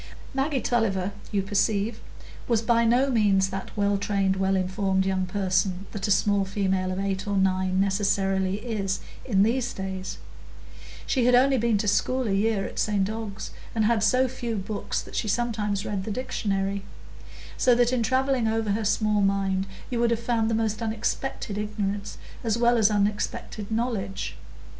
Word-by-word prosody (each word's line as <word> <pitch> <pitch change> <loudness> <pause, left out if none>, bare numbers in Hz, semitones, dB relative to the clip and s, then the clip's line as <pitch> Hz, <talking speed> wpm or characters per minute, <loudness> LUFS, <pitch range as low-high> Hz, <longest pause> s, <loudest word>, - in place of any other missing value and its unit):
Maggie 270 0 0
Tulliver, 200 -5 0 0.2
you 200 -2 +1
perceive, 205 +2 0 0.5
was 230 -2 +2
by 235 0 +3
no 250 +4 +3
means 200 -5 +3
that 195 +2 -6
well 200 -1 +2
trained, 195 -1 +1
well 190 0 +1
informed 190 0 0
young 190 -1 0
person 185 0 0
that 200 -2 -3
a - - -3
small 200 0 +3
female 190 -1 0
of 185 - -3
eight 195 +1 -2
or 200 -1 0
nine 185 -1 +1
necessarily 195 -1 +1
is 200 -5 -2 0.2
in 195 -6 +3
these 240 +2 +1
days; 190 -1 -5 0.9
she 255 -4 +1
had 250 - +6
only 265 +1 +4
been 230 -2 +2
to 210 - -1
school 250 +5 +1
a - - 0
year 200 0 +1
at - - -6
St 200 -2 +1
Ogg's, 220 -2 -6 0.2
and 220 -1 +2
had 225 0 +2
so 255 +4 +3
few 240 -2 -4
books 205 +1 -3
that - - -11
she 220 - -1
sometimes 210 -3 -1
read 200 -2 -2
the 220 - -5
dictionary; 200 -4 -2 0.7
so 250 -3 +4
that 245 +1 +3
in 250 - +1
travelling 260 0 +1
over 220 -1 0
her 215 +2 0
small 210 0 +2
mind 195 -1 +1 0.2
you 240 - -1
would 235 0 +3
have 235 -1 +1
found 230 -1 0
the 225 - +1
most 220 0 -1
unexpected 220 -1 -2
ignorance 205 -1 -3 0.3
as 225 -1 +1
well 240 0 +3
as 215 -1 +5
unexpected 205 0 -1
knowledge. 220 -4 -2
205 Hz, 170 wpm, -26 LUFS, 195-230 Hz, 0.9 s, had